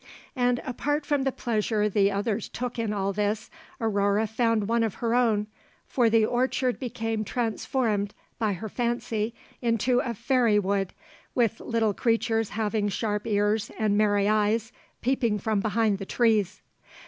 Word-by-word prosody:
And 245 Hz, -1 st, +1 dB
apart 290 Hz, +3 st, -1 dB
from 285 Hz, -2 st, +1 dB
the 270 Hz, -, +2 dB
pleasure 215 Hz, -3 st, 0 dB
the 200 Hz, -1 st, +3 dB
others 205 Hz, +2 st, -2 dB
took 245 Hz, -1 st, -4 dB
in 225 Hz, -2 st, -1 dB
all 200 Hz, -1 st, -1 dB
this, 210 Hz, +2 st, -1 dB, 0.3 s
Aurore 205 Hz, -1 st, +1 dB
found 220 Hz, -1 st, +1 dB
one 230 Hz, +1 st, +2 dB
of 225 Hz, -4 st, 0 dB
her 230 Hz, -1 st, -1 dB
own, 225 Hz, -4 st, +3 dB, 0.4 s
for 240 Hz, -3 st, +2 dB
the 225 Hz, -1 st, +4 dB
orchard 250 Hz, +1 st, 0 dB
became 225 Hz, -3 st, -2 dB
transformed 220 Hz, -2 st, -1 dB, 0.2 s
by 215 Hz, -3 st, +1 dB
her 195 Hz, +4 st, -5 dB
fancy 235 Hz, -1 st, -2 dB, 0.3 s
into 240 Hz, +1 st, +2 dB
a 235 Hz, -2 st, -2 dB
fairy 235 Hz, -1 st, +2 dB
wood, 195 Hz, -1 st, 0 dB, 0.4 s
with 230 Hz, -3 st, +2 dB
little 225 Hz, -3 st, 0 dB
creatures 225 Hz, 0 st, +1 dB
having 210 Hz, -1 st, -1 dB
sharp 210 Hz, 0 st, -2 dB
ears 210 Hz, 0 st, +1 dB
and 215 Hz, -2 st, +1 dB
merry 205 Hz, -1 st, +3 dB
eyes 215 Hz, +2 st, +1 dB, 0.3 s
peeping 240 Hz, -4 st, +1 dB
from 215 Hz, 0 st, 0 dB
behind 215 Hz, 0 st, +1 dB
the 195 Hz, -, -5 dB
trees. 215 Hz, -5 st, +1 dB
220 Hz, 150 wpm, -26 LUFS, 210-235 Hz, 0.4 s, the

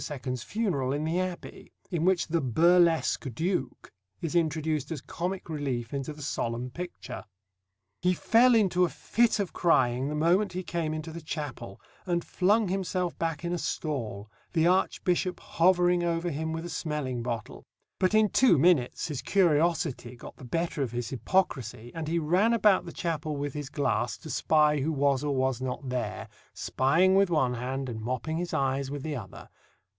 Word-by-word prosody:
's 130 Hz, -3 st, -4 dB
funeral 145 Hz, -, -1 dB
in 145 Hz, +2 st, -2 dB
the 165 Hz, +3 st, 0 dB
Abbey, 185 Hz, -1 st, -5 dB, 0.2 s
in 170 Hz, -3 st, -1 dB
which 185 Hz, -1 st, +3 dB
the 165 Hz, 0 st, 0 dB
"burlesque 165 Hz, +1 st, +3 dB
Duke" 160 Hz, -, -2 dB, 0.3 s
is 165 Hz, -, -4 dB
introduced 155 Hz, -3 st, 0 dB
as 160 Hz, -, -3 dB
comic 180 Hz, +7 st, -4 dB
relief 135 Hz, -7 st, -3 dB
into 140 Hz, +1 st, -3 dB
the 150 Hz, -1 st, -9 dB
solemn 120 Hz, -2 st, -3 dB
picture: 175 Hz, +5 st, -7 dB, 0.8 s
He 180 Hz, 0 st, +2 dB
fell 235 Hz, +6 st, +5 dB
into 185 Hz, -5 st, +3 dB
a 175 Hz, -, +3 dB
fit 235 Hz, +6 st, +1 dB
of 200 Hz, -3 st, -2 dB
crying 130 Hz, -5 st, +2 dB
the 150 Hz, -, -3 dB
moment 180 Hz, +5 st, +2 dB
he 185 Hz, +1 st, -3 dB
came 165 Hz, -3 st, -2 dB
into 155 Hz, +1 st, -5 dB
the 170 Hz, +1 st, -7 dB
chapel, 145 Hz, -10 st, -6 dB, 0.3 s
and 175 Hz, -1 st, 0 dB
flung 205 Hz, +3 st, +2 dB
himself 185 Hz, -2 st, -1 dB
back 165 Hz, 0 st, -2 dB
in 175 Hz, -, -1 dB
a 175 Hz, -, -1 dB
stall, 115 Hz, -13 st, -3 dB, 0.3 s
the 160 Hz, -1 st, +3 dB
Archbishop 180 Hz, 0 st, +1 dB
hovering 175 Hz, 0 st, +3 dB
over 170 Hz, 0 st, 0 dB
him 160 Hz, +2 st, -3 dB
with 165 Hz, +1 st, -4 dB
a -, -, -5 dB
smelling 150 Hz, -8 st, -3 dB
bottle; 115 Hz, -2 st, -5 dB, 0.4 s
but 185 Hz, +3 st, +2 dB
in 215 Hz, -1 st, +5 dB
two 250 Hz, -8 st, +5 dB
minutes 140 Hz, -4 st, +3 dB
his 145 Hz, -5 st, -4 dB
curiosity 160 Hz, -8 st, +1 dB
got 120 Hz, -, -11 dB
the -, -, -14 dB
better 165 Hz, +4 st, -2 dB
of 130 Hz, -4 st, -1 dB
his 120 Hz, -1 st, -3 dB
hypocrisy, 120 Hz, -, -1 dB
and 165 Hz, -2 st, -5 dB
he 165 Hz, +2 st, 0 dB
ran 180 Hz, +8 st, +2 dB
about 210 Hz, -4 st, +4 dB
the 170 Hz, -, -7 dB
chapel 155 Hz, -4 st, -3 dB
with 145 Hz, -1 st, -3 dB
his 145 Hz, -2 st, -5 dB
glass 130 Hz, -5 st, -1 dB
to 160 Hz, -, -9 dB
spy 150 Hz, -1 st, +3 dB
who 150 Hz, +4 st, 0 dB
was 140 Hz, -2 st, +1 dB
or 145 Hz, -2 st, 0 dB
was 130 Hz, -1 st, 0 dB
not 130 Hz, +1 st, -4 dB
there, 110 Hz, -3 st, -3 dB, 0.3 s
spying 165 Hz, +8 st, +2 dB
with 195 Hz, -1 st, +4 dB
one 150 Hz, -7 st, +2 dB
hand 130 Hz, +3 st, -3 dB
and 115 Hz, -3 st, -5 dB
mopping 130 Hz, +7 st, -2 dB
his 175 Hz, +1 st, -3 dB
eyes 135 Hz, 0 st, 0 dB
with 140 Hz, -1 st, -5 dB
the 155 Hz, -2 st, -3 dB
other. 105 Hz, -8 st, -9 dB
155 Hz, 180 wpm, -28 LUFS, 130-175 Hz, 0.8 s, fell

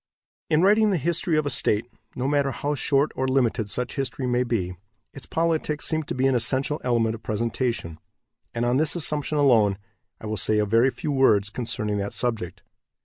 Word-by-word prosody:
In 155 Hz, +2 st, +3 dB
writing 210 Hz, +2 st, +4 dB
the 195 Hz, -, +1 dB
history 170 Hz, +1 st, 0 dB
of 155 Hz, -, +1 dB
a 145 Hz, -, -1 dB
state, 110 Hz, -2 st, 0 dB, 0.3 s
no 130 Hz, +1 st, -2 dB
matter 140 Hz, -1 st, +1 dB
how 145 Hz, +3 st, -2 dB
short 140 Hz, +1 st, +1 dB
or 130 Hz, -, -1 dB
limited 125 Hz, -5 st, +1 dB
such 125 Hz, +6 st, -2 dB
history 135 Hz, -1 st, -2 dB
may 125 Hz, 0 st, +1 dB
be, 100 Hz, -7 st, -2 dB, 0.4 s
its 135 Hz, -, -11 dB
politics 160 Hz, -2 st, -1 dB
seem 160 Hz, -1 st, 0 dB
to 150 Hz, -, -6 dB
be 130 Hz, +1 st, 0 dB
an 135 Hz, -, +3 dB
essential 130 Hz, +5 st, +1 dB
element 115 Hz, -3 st, +1 dB
of 115 Hz, -, -8 dB
presentation, 115 Hz, -6 st, -2 dB, 0.5 s
and, 120 Hz, 0 st, -2 dB
on 120 Hz, +1 st, +2 dB
this 155 Hz, +3 st, +1 dB
assumption 150 Hz, -2 st, 0 dB
alone, 115 Hz, -9 st, +4 dB, 0.4 s
I -, -, -10 dB
will 110 Hz, 0 st, -3 dB
say 105 Hz, +3 st, +2 dB
a 105 Hz, -, +2 dB
very 115 Hz, +5 st, +3 dB
few 135 Hz, +4 st, -4 dB
words 105 Hz, -7 st, +3 dB
concerning 105 Hz, -3 st, -3 dB
that 100 Hz, 0 st, -4 dB
subject. 115 Hz, -8 st, -2 dB
125 Hz, 195 wpm, -24 LUFS, 110-145 Hz, 0.5 s, writing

